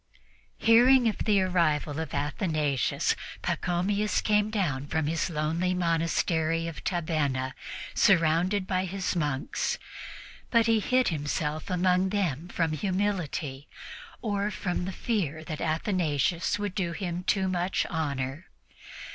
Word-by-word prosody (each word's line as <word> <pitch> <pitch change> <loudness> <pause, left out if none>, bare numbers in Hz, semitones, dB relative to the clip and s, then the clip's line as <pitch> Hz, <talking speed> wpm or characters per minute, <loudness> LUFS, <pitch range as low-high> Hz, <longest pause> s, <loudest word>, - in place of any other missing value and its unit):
Hearing 240 +2 +6
of 215 - -1
the 210 -2 +4
arrival 160 -5 +1
of 160 -3 -4
Athanasius, 145 -2 0 0.3
Pachomius 200 +4 0
came 210 0 +2
down 155 -11 -1
from 160 +1 0
his 160 +4 0
lonely 165 +3 0
monastery 165 -1 +1
of 165 - -7
Tabenna, 150 -7 -1 0.4
surrounded 180 +2 +3
by 185 -1 0
his 190 0 -2
monks; 145 -5 -1 0.7
but 230 -2 +4
he 225 -1 +3
hid 255 +4 +2
himself 150 -1 -2
among 185 +1 +2
them 175 -6 -1
from 165 -3 -1
humility, 175 -6 -2 0.6
or 205 -2 0
from 185 -2 -2
the 190 - -3
fear 170 - -2
that 155 -2 -6
Athanasius 165 -1 0
would 205 -2 -3
do 175 -4 -1
him 175 -1 -4
too 190 0 +1
much 180 0 0
honor. 145 0 -3
175 Hz, 120 wpm, -28 LUFS, 155-195 Hz, 0.7 s, Hearing